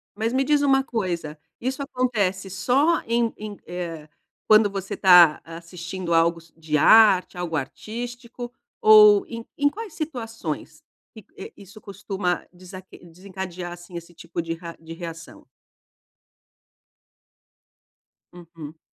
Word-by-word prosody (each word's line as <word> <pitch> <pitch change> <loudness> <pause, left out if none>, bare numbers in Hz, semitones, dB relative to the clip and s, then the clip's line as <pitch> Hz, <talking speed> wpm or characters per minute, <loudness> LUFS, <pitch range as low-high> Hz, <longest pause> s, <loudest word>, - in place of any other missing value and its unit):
Mas 220 +3 -2
me 265 +1 +1
diz 295 0 +2
uma 270 -1 +3
coisa, 175 - -4 0.2
isso 265 +3 -3
acontece 210 -8 -1
só 255 - +2
em 230 0 0
em, 210 -1 -8
eh, 170 -3 -6 0.4
quando 215 -1 +5
você 195 -1 -5
tá 180 -5 +7
assistindo 170 +1 -6
algo 165 0 +2 0.2
de 155 -2 -1
arte, 210 -1 +5
algo 170 -2 -3
artístico, 240 - -7 0.3
ou 425 -3 +7
em 230 0 -8
em 285 - +3
quais 420 +3 -8
situações? 245 -8 -6 0.3
Que, 220 -4 -13
eh, - - -9
isso 200 +2 -14
costuma 195 -2 -4
desaque 185 +1 -13
desencadear, 180 0 -8
assim, 175 0 -11
esse 170 0 -10
tipo 170 0 -6
de 165 0 -4
ra 165 0 -10
de 165 0 -10
reação? 165 -1 -10 2.9
Uhum. 165 -3 -12
190 Hz, 125 wpm, -23 LUFS, 170-235 Hz, 2.9 s, tá